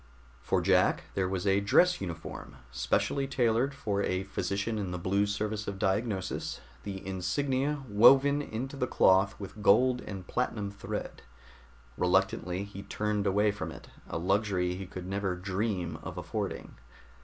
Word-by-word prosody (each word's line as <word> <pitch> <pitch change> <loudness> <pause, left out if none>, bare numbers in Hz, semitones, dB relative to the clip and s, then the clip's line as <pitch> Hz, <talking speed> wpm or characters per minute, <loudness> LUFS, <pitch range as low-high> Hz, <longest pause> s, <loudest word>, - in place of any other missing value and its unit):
For - - +1
Jack - - +3
there 95 -1 0
was 95 0 -2
a 100 0 +4
dress 180 - +4
uniform, 85 -4 -6 0.2
specially 135 - 0
tailored 125 +1 +1
for 100 -6 -1
a 95 -1 0
physician 100 +2 -2
in 100 -3 -3
the 90 - -3
Blue 100 +3 +1
Service 105 +1 -2
of 100 - -3
Diagnosis, 95 0 -1 0.2
the 95 -2 -6
insignia 135 +10 -1
woven 135 +7 +6
into 130 +1 -5
the 125 -2 -1
cloth 95 -2 +4
with 105 +1 -8
gold 125 +5 +4
and 95 -3 -7
platinum 105 -4 -2
thread. 100 - -6 0.8
Reluctantly 90 0 +1
he 100 -1 -8
turned 105 0 -1
away 105 +2 +3
from 85 -6 -5
it, 75 - -12 0.2
a - - -2
luxury 95 0 +1
he 95 +1 -6
could 90 -1 -7
never 95 -1 -1
dream 90 -3 -2
of - - -7
affording. - - -4
100 Hz, 150 wpm, -30 LUFS, 95-110 Hz, 0.8 s, woven